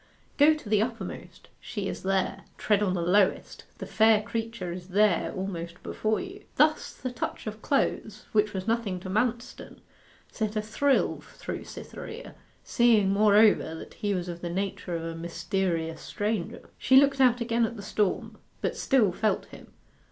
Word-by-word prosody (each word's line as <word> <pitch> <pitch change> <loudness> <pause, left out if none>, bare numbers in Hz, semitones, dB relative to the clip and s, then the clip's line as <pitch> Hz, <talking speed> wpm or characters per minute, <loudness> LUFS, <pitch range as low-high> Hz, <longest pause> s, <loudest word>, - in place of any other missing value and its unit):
Go 305 +2 +7
to 300 -7 -10
the 210 0 +3
uppermost: 225 -5 -6
she 205 -3 -5
is - - -5
there; 195 0 -1
tread 210 -1 +2
on 190 -3 +1
the 170 - -1
lowest: 190 +3 +1
the - - -6
fair 220 -1 +4
creature 225 -5 -4
is 175 0 -7
there 200 -1 +2
almost 175 -3 -5
before 215 0 -1
you. 380 +2 -8
Thus - - +3
the 255 - -5
touch 245 - -5
of 215 0 -6
clothes, 215 -6 -1
which 210 -1 +2
was 190 -2 -4
nothing 225 -5 0
to 185 - -6
Manston, 235 +3 -2 0.5
sent 215 -2 -3
a 215 - +1
thrill 270 +6 +1
through - - -7
Cytherea, - - -9 0.3
seeing, 225 -5 +3
moreover, 205 -4 +4
that - - -10
he 205 -1 -2
was 180 -1 -3
of 175 -1 -6
the 175 - -4
nature 195 0 -3
of 165 - -4
a 165 - -4
mysterious 165 0 -2
stranger. 210 +1 -3
She 260 - +3
looked 275 0 +5
out 250 -2 +5
again 235 0 +1
at 225 - -5
the 205 - -8
storm, 205 -2 -1 0.2
but - - -2
still 240 -9 +3
felt 215 +4 0
him. - - -13
210 Hz, 170 wpm, -27 LUFS, 185-230 Hz, 0.5 s, Go